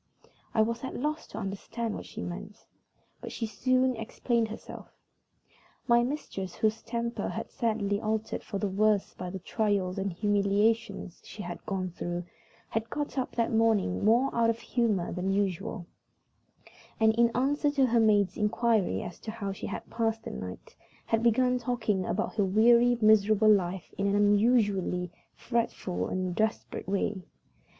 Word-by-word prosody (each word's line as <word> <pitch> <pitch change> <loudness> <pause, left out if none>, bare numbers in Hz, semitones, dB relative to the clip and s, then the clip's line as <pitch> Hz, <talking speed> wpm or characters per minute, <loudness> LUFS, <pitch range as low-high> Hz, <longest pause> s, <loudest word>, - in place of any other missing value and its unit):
I 220 - +5
was 230 +3 -3
at 260 - -5
a - - -3
loss 305 +4 -2
to - - -9
understand 215 +3 -4
what - - -7
she - - -7
meant, 200 +4 -8 0.6
but - - -7
she 230 - -3
soon 255 +3 +1
explained 230 +1 -1
herself. 220 - -9 1.0
My 235 -1 +5
mistress, 240 - -4
whose 220 0 0
temper 235 0 -3
had 225 - -3
been - - -28
sadly 210 -3 0
altered 220 0 -2
for 200 - -4
the 205 - -1
worse 205 +1 +1
by 180 - -6
the 190 - -5
trials 195 -1 -1
and 195 0 -1
humiliations 205 +1 0
she 205 - -8
had 175 0 -7
gone 185 -2 -2
through, 175 +1 -4 0.5
had 225 +1 -2
got 290 -2 -3
up 255 - -3
that 230 -1 0
morning 220 - +2
more 240 +5 +3
out 230 -1 +3
of 230 - +1
humor 225 -7 0
than 180 +2 -2
usual, 195 0 -1 1.1
and, 220 0 +5
in 235 +1 +4
answer 290 +3 +2
to 280 -2 +3
her 240 -1 +3
maid's 205 -3 +3
inquiry 215 -1 +1
as 175 - -8
to - - -7
how 215 -3 -4
she 195 - -6
had - - -6
passed 225 -1 -1
the - - -6
night, 90 0 -8 0.3
had 225 0 +1
begun 250 +2 +3
talking 230 -6 -1
about 210 - -1
her 205 - +4
weary, 235 +5 +5
miserable 215 0 +5
life 185 -2 -2
in 200 - +1
an 200 - +2
unusually 205 -4 +2 0.2
fretful 230 -6 -2
and 185 -1 -2
desperate 220 +3 -2
way. 200 0 -1
215 Hz, 165 wpm, -29 LUFS, 195-235 Hz, 1.1 s, I